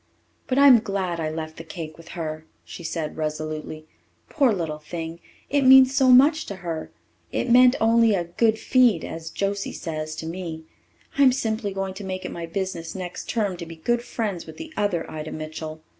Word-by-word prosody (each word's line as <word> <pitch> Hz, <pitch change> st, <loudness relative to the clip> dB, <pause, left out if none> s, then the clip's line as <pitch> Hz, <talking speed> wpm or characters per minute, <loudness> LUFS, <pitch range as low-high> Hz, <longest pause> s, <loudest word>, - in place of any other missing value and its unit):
"But 255 Hz, -, 0 dB
I'm 275 Hz, -4 st, +8 dB
glad 195 Hz, -5 st, -2 dB
I 155 Hz, -1 st, -1 dB
left 155 Hz, 0 st, -6 dB
the 165 Hz, -, -7 dB
cake 160 Hz, -1 st, -7 dB
with 165 Hz, 0 st, -15 dB
her," 155 Hz, -1 st, -5 dB, 0.2 s
she 170 Hz, -, -9 dB
said 160 Hz, -1 st, -4 dB
resolutely. 155 Hz, 0 st, -4 dB, 0.4 s
"Poor 275 Hz, -6 st, +3 dB
little 165 Hz, -6 st, -3 dB
thing! 165 Hz, +1 st, -6 dB, 0.3 s
It 285 Hz, 0 st, +1 dB
means 265 Hz, 0 st, +8 dB
so 265 Hz, -1 st, +4 dB
much 285 Hz, +5 st, +6 dB
to 200 Hz, -, -5 dB
her. 160 Hz, -2 st, -4 dB, 0.4 s
It 240 Hz, -, -1 dB
meant 250 Hz, +1 st, +7 dB
only 225 Hz, -1 st, +4 dB
'a 175 Hz, -, 0 dB
good 220 Hz, +6 st, +1 dB
feed,' 240 Hz, -8 st, +3 dB
as 160 Hz, 0 st, -6 dB
Josie 200 Hz, +3 st, -2 dB
says, 155 Hz, -2 st, -5 dB
to 160 Hz, -, -6 dB
me. 165 Hz, -1 st, -5 dB, 0.6 s
I'm 270 Hz, -2 st, +7 dB
simply 220 Hz, -5 st, -2 dB
going 195 Hz, 0 st, -3 dB
to 200 Hz, +2 st, -8 dB
make 185 Hz, -1 st, -5 dB
it -, -, -4 dB
my 170 Hz, -1 st, -6 dB
business 170 Hz, -2 st, -4 dB
next 180 Hz, -1 st, -6 dB
term 205 Hz, -6 st, -1 dB
to 170 Hz, -, -6 dB
be 165 Hz, -, -9 dB
good 235 Hz, +9 st, 0 dB
friends 210 Hz, -8 st, -4 dB
with 160 Hz, -, -10 dB
the 320 Hz, 0 st, -9 dB
other 205 Hz, -5 st, 0 dB
Ida 155 Hz, 0 st, -6 dB
Mitchell. 155 Hz, 0 st, -7 dB
180 Hz, 190 wpm, -24 LUFS, 160-230 Hz, 0.6 s, I'm